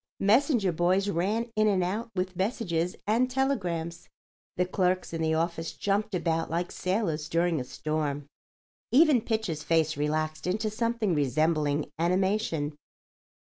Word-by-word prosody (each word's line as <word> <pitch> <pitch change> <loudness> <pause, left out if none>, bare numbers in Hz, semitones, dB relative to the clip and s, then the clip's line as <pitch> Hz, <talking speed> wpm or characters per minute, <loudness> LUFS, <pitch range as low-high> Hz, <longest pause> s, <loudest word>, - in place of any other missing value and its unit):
Messenger 220 - +3
boys 185 +4 +1
ran 210 +7 -1
in 215 0 +3
and 190 -3 +2
out 215 +6 -2
with 185 0 -2
messages 180 -4 -1
and 235 +5 +2
telegrams. 180 -12 -2 0.5
The 180 - +2
clerks 185 -1 0
in 165 - -2
the 160 0 +1
office 165 0 -2
jumped 205 0 -1
about 165 -2 0
like 170 +2 -2
sailors 185 -6 -1
during 170 -3 +1
a - - -3
storm. 145 +1 -3 0.7
Even 290 -2 +5
Pitcher's 220 -9 -2
face 160 -1 +1
relaxed 155 +2 -1
into 215 +4 0
something 230 -3 0
resembling 150 +1 +1
animation. 180 -3 +1
180 Hz, 135 wpm, -28 LUFS, 160-215 Hz, 0.7 s, Even